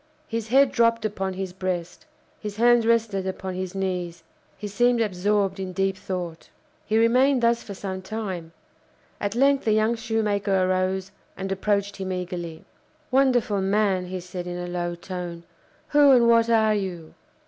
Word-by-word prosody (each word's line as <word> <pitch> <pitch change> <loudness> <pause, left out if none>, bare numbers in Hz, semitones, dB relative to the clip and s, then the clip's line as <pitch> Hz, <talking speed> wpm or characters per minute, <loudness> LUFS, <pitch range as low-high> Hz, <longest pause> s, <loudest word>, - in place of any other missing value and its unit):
His 225 -3 -3
head 270 +3 +4
dropped 230 -1 +2
upon 195 -3 -2
his 185 -1 -5
breast; 180 - -4 0.3
his 210 -1 -6
hands 235 0 +4
rested 220 -5 +1
upon 190 0 -4
his 185 0 -5
knees; 180 -3 -3 0.3
he 210 - -5
seemed 240 +4 +2
absorbed 200 -1 0
in 185 -1 -4
deep 195 +1 0
thought. 180 -3 -6 0.4
He 215 - +2
remained 250 +3 +4
thus 235 0 +3
for 200 - -8
some 190 -1 -5
time. 190 -5 -5 0.7
At 205 +1 -2
length 275 +2 +3
the 220 - +2
young 215 +2 +2
shoemaker 210 -4 0
arose 185 +1 0 0.3
and 195 0 -4
approached 200 +1 0
him 190 -1 -4
eagerly. 175 -3 -5 0.5
"Wonderful 250 -6 +2
man!" 195 -2 +1
he 185 +1 -4
said, 180 0 -7
in 175 0 -4
a 180 - -4
low 175 -1 -3
tone. 175 -1 -6 0.5
"Who 290 -1 +6
and 240 -2 +5
what 230 0 +4
are 220 -2 +4
you?" 180 -6 -4
195 Hz, 160 wpm, -24 LUFS, 185-225 Hz, 0.7 s, Who